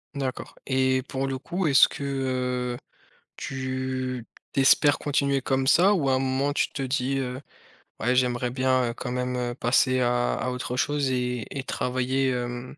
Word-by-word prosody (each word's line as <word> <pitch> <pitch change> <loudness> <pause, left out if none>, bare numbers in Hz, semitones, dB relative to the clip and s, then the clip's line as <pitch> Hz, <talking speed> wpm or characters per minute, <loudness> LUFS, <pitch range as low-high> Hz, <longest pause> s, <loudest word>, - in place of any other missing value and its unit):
D'accord 130 -2 -4
et 130 -1 +2
pour 135 0 -3
le 135 -1 -2
coup, 175 +5 -2
est-ce 135 -2 +7
que, 140 - -7
heu, 125 -2 -2 0.6
tu 130 -2 -4 0.3
tu - - 0
espères 145 +2 +5
continuer 140 -1 +1
comme 130 0 0
ça 185 +8 +5
ou 145 -6 0
à - - +3
un 130 - +2
moment 135 +2 0
tu - - 0
te 135 - -4
dis, 130 +1 -1
heu: 130 0 -3 0.6
«Ouais, 125 +3 +1
j'aimerais 125 -1 +1
bien, 130 -1 +1
heu, - - -8
quand 125 +1 -5
même, 125 0 -2
heu, 120 -1 -2
passer 130 +1 +2
à 120 0 +1
à 125 - -2
autre 125 0 -4
chose 145 0 0
et 125 -2 -1
et 135 -1 -4
travailler» 130 +1 -1
hem, 125 +2 -4
130 Hz, 180 wpm, -26 LUFS, 125-135 Hz, 0.6 s, est-ce